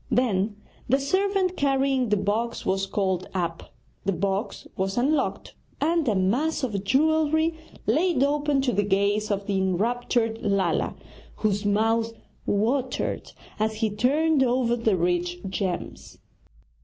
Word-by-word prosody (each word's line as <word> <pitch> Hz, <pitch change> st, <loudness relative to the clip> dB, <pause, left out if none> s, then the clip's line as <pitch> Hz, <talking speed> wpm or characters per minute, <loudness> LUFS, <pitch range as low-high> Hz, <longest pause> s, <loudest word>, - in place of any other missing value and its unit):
Then 210 Hz, -4 st, +1 dB, 0.3 s
the 270 Hz, +3 st, +4 dB
servant 375 Hz, +5 st, +1 dB
carrying 270 Hz, -4 st, +1 dB
the 210 Hz, -, +3 dB
box 220 Hz, +4 st, -1 dB
was 195 Hz, +1 st, 0 dB
called 190 Hz, -2 st, -1 dB
up; 170 Hz, -2 st, -3 dB, 0.3 s
the 195 Hz, -, +1 dB
box 195 Hz, +4 st, -2 dB
was 195 Hz, +2 st, -2 dB
unlocked, 275 Hz, +3 st, 0 dB, 0.3 s
and 325 Hz, 0 st, +1 dB
a 215 Hz, -, +2 dB
mass 245 Hz, +13 st, +1 dB
of 205 Hz, -6 st, -2 dB
jewellery 315 Hz, +6 st, +2 dB, 0.3 s
laid 310 Hz, -, +2 dB
open 290 Hz, -1 st, +1 dB
to 265 Hz, -2 st, +1 dB
the 205 Hz, -, +1 dB
gaze 205 Hz, +1 st, +1 dB
of 200 Hz, -1 st, -1 dB
the 195 Hz, -1 st, 0 dB
enraptured 225 Hz, +4 st, 0 dB
Lala, 195 Hz, -5 st, 0 dB, 0.4 s
whose 205 Hz, -1 st, -1 dB
mouth 225 Hz, +2 st, +1 dB, 0.3 s
watered 245 Hz, +6 st, -1 dB, 0.3 s
as 220 Hz, 0 st, 0 dB
he 215 Hz, -1 st, 0 dB
turned 290 Hz, +7 st, +2 dB
over 245 Hz, -2 st, +2 dB
the 225 Hz, -5 st, +1 dB
rich 175 Hz, 0 st, 0 dB
gems. 190 Hz, -1 st, -4 dB
225 Hz, 130 wpm, -25 LUFS, 195-275 Hz, 0.4 s, the